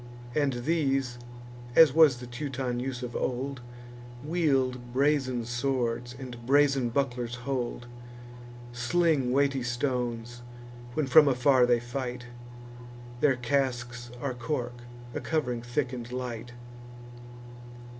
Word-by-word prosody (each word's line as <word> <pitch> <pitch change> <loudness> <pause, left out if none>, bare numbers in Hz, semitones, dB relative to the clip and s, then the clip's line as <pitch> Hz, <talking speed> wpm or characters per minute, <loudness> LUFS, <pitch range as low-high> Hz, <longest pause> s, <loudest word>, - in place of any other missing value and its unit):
And 145 -3 +1
these 135 -6 0 0.6
(as 160 -5 +8
was 155 -5 +6
the 125 - -8
Teuton 125 0 -3
use 130 0 -4
of 120 -1 -6
old) 130 +1 -2 0.6
Wield 135 -7 0
brazen 130 -3 +1
swords, 120 -1 -1
and 125 -3 -8
brazen 135 -1 +3
bucklers 120 -2 -1
hold; 125 -3 -2 0.9
Sling 135 +2 +1
weighty 140 0 +2
stones, 120 -1 -2 0.5
when 155 - +1
from 145 +3 +7
afar 130 -1 +4
they 120 -1 +4
fight; 125 0 -5 0.9
Their 140 -1 +4
casques 120 -2 -1
are 135 0 -2
cork, 120 -1 -4 0.3
a - - -2
covering 125 -7 -1
thick 125 +2 -2
and 120 -1 -6
light. 120 -2 -5
125 Hz, 110 wpm, -28 LUFS, 120-140 Hz, 0.9 s, as